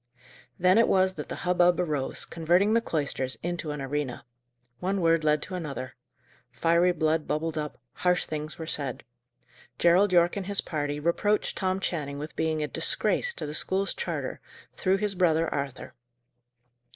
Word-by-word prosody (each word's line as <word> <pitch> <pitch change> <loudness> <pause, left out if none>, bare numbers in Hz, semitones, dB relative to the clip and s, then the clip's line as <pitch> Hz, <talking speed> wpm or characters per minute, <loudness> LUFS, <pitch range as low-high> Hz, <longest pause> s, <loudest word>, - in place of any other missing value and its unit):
Then 185 +4 +5
it 230 - +5
was 190 0 +3
that - - -7
the - - -3
hubbub 180 0 +4
arose, 150 -6 -2
converting 175 +6 +2
the 230 - +4
cloisters 140 - -2
into 175 -2 -3
an 150 0 -4
arena. 135 -2 -3 0.5
One 195 +2 -1
word 165 -2 +3
led 150 -1 +2
to 185 - -8
another. 140 -7 -5 0.6
Fiery 170 +2 +3
blood 160 -2 0
bubbled 160 +1 -1
up; 150 -1 -4 0.2
harsh 180 0 +1
things 155 0 -5
were 160 - -5
said. 145 -4 -3 0.7
Gerald 180 +4 +4
Yorke 175 +1 +4
and 195 -2 -4
his 200 -1 +2
party 145 -2 -3
reproached 190 +7 +1
Tom 185 -1 0
Channing 150 -7 -3
with 150 +2 -7
being 160 -1 0
a - - -1
disgrace 485 - 0
to - - -4
the 150 - -5
school's 195 +5 -1
charter, 475 - -4 0.3
through 190 0 +1
his 205 0 -1
brother 165 -3 +2
Arthur. 140 -2 -4
165 Hz, 165 wpm, -27 LUFS, 150-185 Hz, 0.7 s, Then